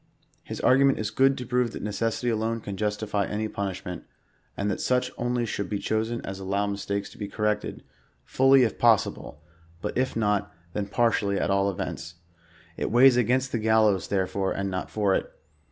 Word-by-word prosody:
His - - -7
argument 135 +1 +4
is 105 -1 -3
good 135 +4 +3
to 125 - -5
prove 125 -1 0
that - - -6
necessity 115 +3 -1
alone 115 0 -1
can 100 -2 -6
justify 105 0 -1
any 110 +1 -2
punishment, 95 -4 -5 0.5
land 105 +1 0
that - - -3
such 125 0 +1
only 120 0 -1
should 100 -3 -3
be 105 - -1
chosen 110 +3 -1
as 95 0 -6
allow 100 +1 -1
mistakes 100 0 -3
to - - -16
be 105 - -3
coi'rected, 105 -1 -2 0.4
fully 135 0 +5
if 115 - -1
possible, 110 -9 +1 0.4
but - - -4
if 130 +1 0
not, 105 -2 0 0.2
then 105 -1 -2
par 115 +3 +2
tially 100 -3 0
at - - 0
all 100 0 +2
events. 85 -2 -5 0.6
It - - -2
weighs 125 +3 +6
against 125 +2 +1
the 115 - -1
gallows, 110 -3 +3
therefore, 95 0 -1
and 100 0 -2
not 95 - -3
for 105 -3 +1
it. - - -1
105 Hz, 185 wpm, -26 LUFS, 100-120 Hz, 0.6 s, weighs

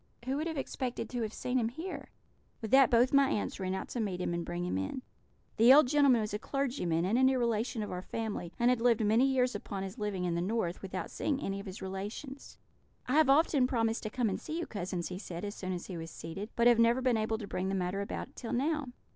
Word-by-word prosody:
'Who 265 +2 -1
would 310 +3 -1
have 320 -2 -4
expected 260 -2 -4
to 245 -1 -2
have 220 -2 -2
seen 250 +3 -1
him 225 -1 0
here?' 325 +10 -7 0.5
"With 220 -3 -6
that 270 -1 +7
both 245 +3 +4
my 275 -1 +5
aunts 205 - -2
ran 190 0 -2
out 190 - -5
to 245 - -4
meet 195 -5 -2
him 175 - -1
and 170 0 -2
bring 175 +1 -3
him 180 - -2
in. 95 - -3 0.5
The 230 +3 +7
old 285 0 +8
gentleman 275 -4 +4
was 210 -1 -3
a 210 - -2
clergyman, 225 - -1
and 220 +6 +2
a - - +4
near 260 0 +4
relation 230 -1 0
of 210 - -5
our 180 - -4
family, 210 -4 -4
and 240 +1 +4
had 250 -2 0
lived 230 -2 +3
many 225 +6 +4
years 255 -2 +2
upon 200 -1 -5
his 195 +5 -7
living 200 -4 -2
in 175 - 0
the 170 - 0
North, 185 -2 -1
without 190 -1 -5
seeing 280 -3 -1
any 195 -6 -3
of 200 - -8
his 190 +1 -7
relations. 205 +9 -6 0.5
"'I 250 - -2
have 305 -2 +5
often 280 -2 +4
promised 225 -3 0
to 215 - -4
come 240 +1 0
and 195 - -2
see 315 - -5
you, 340 - -2
cousins,' 180 -3 -4
he 180 0 -5
said, 175 -2 -6
as 205 - -4
soon 185 -3 -5
as 180 -1 -4
he 180 - -6
was 165 0 -6
seated, 180 +6 -7
'but 235 - +2
never 230 +1 +5
have 260 - -3
been 250 -2 +3
able 220 0 0
to 215 - -6
bring 190 -1 -3
the 195 - -1
matter 185 +1 -1
about 240 +6 -5
till 235 - -5
now.' 295 +3 0
225 Hz, 260 wpm, -31 LUFS, 190-255 Hz, 0.5 s, old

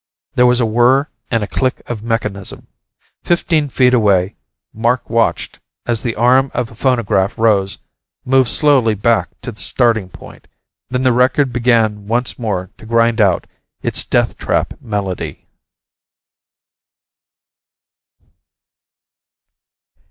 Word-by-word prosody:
There 125 0 +4
was 125 0 +3
a 120 - +2
whir 120 +6 +3 0.2
and 115 -3 0
a - - -4
click 130 +5 -2
of 115 -3 -5
a - - -11
mechanism. 105 -4 -3 0.6
Fifteen 165 -4 +1
feet 125 -1 +3
away, 100 -4 +2 0.4
Mark 120 +2 -1
watched 115 -1 0 0.3
as 120 -2 0
the 115 -2 -3
arm 130 +4 +3
of 115 - -2
a - - -14
phonograph 115 -5 0
rose, 100 -4 +1 0.5
moved 130 -1 +3
slowly 135 -8 +3
back 115 +3 +1
to 125 - -5
the 110 - -14
starting 115 -6 +1
point. - - -14 0.4
Then 125 0 -1
the 130 -2 +3
record 130 +2 +2
began 115 -4 +1
once 120 +4 -1
more 95 -6 -3
to 110 - -13
grind 115 0 +2
out 95 -4 +2 0.4
its - - 0
death - - 0
trap - - -1
melody. 100 -4 -5
115 Hz, 125 wpm, -16 LUFS, 105-125 Hz, 0.6 s, There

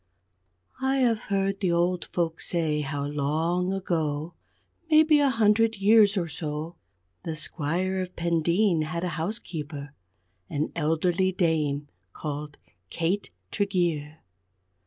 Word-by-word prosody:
I 265 0 +2
have 240 -5 +2
heard 195 -1 0
the 185 -4 +1
old 175 +1 +1
folks 165 -2 -2
say 160 -3 0
how 140 0 -3
long 160 +6 0
ago 165 -4 -2 0.6
maybe 310 -1 +6
a 285 -1 +4
hundred 225 -1 +3
years 205 0 +5
or 175 -3 0
so 155 +1 -5 0.5
the 160 - -4
Squire 180 +5 -1
of 180 0 -6
Pendeen 170 +2 +2
had 170 +2 -3
a 180 - 0
housekeeper, 160 -5 -5 0.6
an 150 +1 -2
elderly 170 +4 +1
dame, 155 -5 0 0.3
called 150 -1 -5 0.3
Kate 175 +5 -1 0.2
Tregeer. 170 -7 -1
170 Hz, 115 wpm, -27 LUFS, 155-195 Hz, 0.6 s, maybe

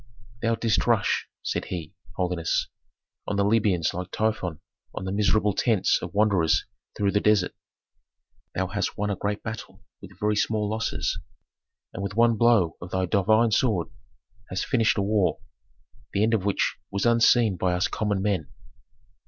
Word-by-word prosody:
"Thou 115 0 +1
didst 115 -1 0
rush," 115 -5 +2 0.2
said - - -2
he, 85 -1 -6 0.2
"holiness, 90 -3 -1 0.6
on 105 - -1
the 100 - +2
Libyans 100 -6 +2
like 90 +1 -5
Typhon 105 -7 -1 0.4
on 95 - -4
the 95 - -3
miserable 105 +1 +2
tents 110 -2 +2
of - - -6
wanderers 100 -6 +3 0.3
through 100 -1 +1
the 105 - +2
desert. 105 -4 +2 1.0
Thou 95 - 0
hast 100 +1 -3
won 105 0 -1
a - - -1
great 100 +2 -3
battle 105 -3 -7 0.2
with 95 0 -13
very 105 0 +1
small 105 0 0
losses, 110 +2 -2 0.7
and 100 - -5
with 100 0 -4
one 115 0 +4
blow 110 -8 +3
of 85 - -7
thy 95 0 0
divine 110 +4 +3
sword 105 -6 +1 0.6
hast 95 0 -2
finished 115 -3 +2
a 100 - +1
war, 100 -2 +1 0.7
the 100 - +2
end 115 +1 +2
of 105 -4 +1
which 100 - 0
was 100 +2 -2
unseen 115 -2 +4
by 90 0 0
us 90 +1 +1
common 100 -3 -1
men." 95 -7 -1
100 Hz, 160 wpm, -25 LUFS, 95-110 Hz, 1.0 s, one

